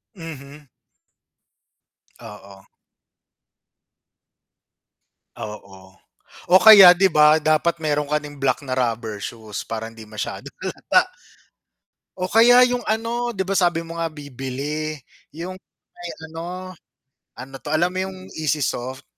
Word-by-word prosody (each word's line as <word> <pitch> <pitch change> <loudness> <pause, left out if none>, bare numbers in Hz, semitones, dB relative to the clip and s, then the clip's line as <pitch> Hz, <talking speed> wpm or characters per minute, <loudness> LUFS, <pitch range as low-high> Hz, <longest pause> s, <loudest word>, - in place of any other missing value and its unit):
Mhm. 150 -3 -11 1.5
Oo. 100 -1 -13 2.7
Oo, 95 -3 -10 0.6
o 180 - +4
kaya 195 -5 +10
'di 190 +1 +3
ba 150 +1 +5
dapat 160 +2 +1
meron 150 -1 0
kaing 145 -1 -4
black 135 0 0
na 130 -1 -4
rubber 115 -4 -2
shoes 110 -1 -7
para 115 0 -5
hindi 110 -1 -13
masyadong 105 -1 -7
halata - - +1 1.1
o 185 0 -3
kaya 245 +3 +6
yung 245 -1 -2
ano 230 +2 -2
'di 190 - -3
ba 195 - -1
sabi 175 -2 +2
mo 165 0 -8
nga 165 -1 -2
bibili 145 +2 -5 0.4
yung 180 +4 -7 0.4
may 175 -1 -8 0.2
ano, 180 +3 -7 0.7
ano 135 +2 -10
'to - - -6
alam 170 +3 +2
mo 185 - -5
yung 190 0 -8 0.2
easy 155 -1 -1
soft? 130 +1 -3
150 Hz, 120 wpm, -21 LUFS, 130-180 Hz, 2.7 s, kaya